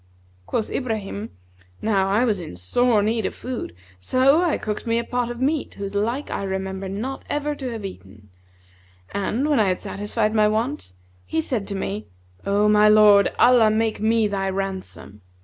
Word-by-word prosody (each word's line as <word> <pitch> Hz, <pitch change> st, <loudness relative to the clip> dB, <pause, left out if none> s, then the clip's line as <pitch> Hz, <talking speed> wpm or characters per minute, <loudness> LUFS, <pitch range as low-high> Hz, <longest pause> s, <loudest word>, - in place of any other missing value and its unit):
(Quoth 220 Hz, -, -2 dB
Ibrahim), 220 Hz, -3 st, -3 dB, 0.5 s
Now 195 Hz, -3 st, +1 dB
I 215 Hz, +5 st, +3 dB
was 210 Hz, -5 st, 0 dB
in 165 Hz, -, -8 dB
sore 210 Hz, -, +2 dB
need 220 Hz, 0 st, 0 dB
of -, -, -7 dB
food 250 Hz, -, -6 dB, 0.2 s
so 265 Hz, -, +3 dB
I 345 Hz, -4 st, +1 dB
cooked 215 Hz, +2 st, -4 dB
me 230 Hz, 0 st, +2 dB
a 235 Hz, -, 0 dB
pot 245 Hz, 0 st, -2 dB
of 240 Hz, 0 st, -6 dB
meat 285 Hz, +3 st, -1 dB
whose 200 Hz, 0 st, -5 dB
like 230 Hz, +8 st, -1 dB
I -, -, -2 dB
remember 190 Hz, 0 st, -4 dB
not 235 Hz, +8 st, -4 dB
ever 295 Hz, 0 st, -1 dB
to 270 Hz, -3 st, -5 dB
have 225 Hz, -4 st, -6 dB
eaten; 105 Hz, -, -11 dB, 0.8 s
and, 225 Hz, +8 st, -1 dB
when 295 Hz, -4 st, +2 dB
I 210 Hz, -, +3 dB
had 185 Hz, -1 st, 0 dB
satisfied 215 Hz, +2 st, -2 dB
my 215 Hz, -1 st, +4 dB
want, 225 Hz, -, -2 dB, 0.3 s
he 95 Hz, -, -2 dB
said 205 Hz, +3 st, -2 dB
to 200 Hz, -, -4 dB
me, 105 Hz, -, -4 dB, 0.4 s
'O 205 Hz, +1 st, +3 dB
my 210 Hz, 0 st, +5 dB
lord, 210 Hz, -1 st, +6 dB
Allah 240 Hz, -3 st, +6 dB
make 220 Hz, 0 st, 0 dB
me 220 Hz, 0 st, +2 dB
thy 195 Hz, -1 st, -2 dB
ransom! 190 Hz, -, -5 dB
215 Hz, 180 wpm, -23 LUFS, 195-240 Hz, 0.8 s, lord